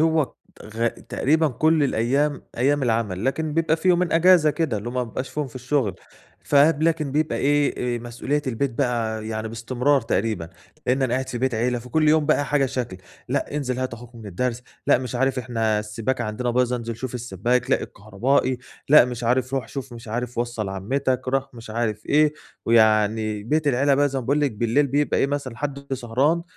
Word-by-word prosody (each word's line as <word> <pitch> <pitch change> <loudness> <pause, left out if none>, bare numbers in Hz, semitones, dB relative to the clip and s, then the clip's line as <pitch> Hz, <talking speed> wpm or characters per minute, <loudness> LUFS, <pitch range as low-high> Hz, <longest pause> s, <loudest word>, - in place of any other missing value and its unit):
هو 160 -3 +2 0.3
غا 115 +2 -1
تقريبًا 155 +6 0
كُلّ 155 +4 +2
الأيام 140 +5 +1
أيام 140 +4 +2
العمل، 110 -4 0
لكن 150 +3 -1
بيبقى 165 -1 +2
في 165 +3 -1
يومين 180 -1 +3
إجازة 165 -2 +5
كده، 155 -7 -1
اللي 110 - -6
هُم 120 - -7
ما 125 -1 0
بيبقاش 125 +3 -5
فيهم 150 -2 -2
في 125 - -14
الشغل، 130 - 0 0.5
فاهم، 145 +2 +4
لكن 160 -4 +1
بيبقى 155 +1 0
إيه 140 -4 +1
آآ، - - -4
مسؤولية 125 +5 -2
البيت 130 +2 -1
بقى 115 -4 -1
يعني 110 0 -3
باستمرار 125 +5 +1
تقريبًا، 110 -6 -1 0.4
لأن 130 +2 +2
أنا 125 -2 +1
قاعد 130 0 -2
في 120 - -4
بيت 130 0 0
عيلة، 120 +2 0
فكُلّ 150 +6 +1
يوم 155 -1 +4
بقى 145 -1 +3
حاجة 145 -2 +1
شكل: 125 -7 -4 0.3
لأ 150 - -2
انزل 130 -3 -2
هات 130 -2 -2
أخوك 120 +1 -13
من 115 -2 -10
الدرس، 120 +6 -2 0.2
لأ - - +5
مش 125 -2 -5
عارف 135 +1 +1
إحنا 115 -4 0
السباكة 105 +4 -2
عندنا 115 +3 -2
بايظة 125 0 +1
انزل 115 -1 -5
شوف 130 0 -6
السباك، 120 +1 -1
لأ - - +2
الكهربائي، 125 +6 0 0.3
لأ 150 -2 +8
مش 120 -1 -5
عارف 130 +2 +1
رُوح 130 -4 -2
شوف 135 -2 -6
مش 115 0 -10
عارف 120 +2 -3
وصّل 120 -4 -2
عمتك، 130 +6 -1
رُوح 135 0 -1
مش 115 -2 -10
عارف 110 -1 -2
إيه، 150 0 +4 0.3
ويعني 110 -1 +3
بيت 150 +7 0
العيلة 140 +2 +3
بقى 145 +1 +3
زي 135 -1 -2
ما 125 - -5
باقول 145 +4 +1
لِك 145 - +2
بالليل 120 +7 +1
بيبقى 145 +2 +1
إيه - - +3
مثلًا 140 -4 -4
حد 140 0 -5
سهران 135 +7 +1
125 Hz, 195 wpm, -23 LUFS, 115-145 Hz, 0.5 s, لأ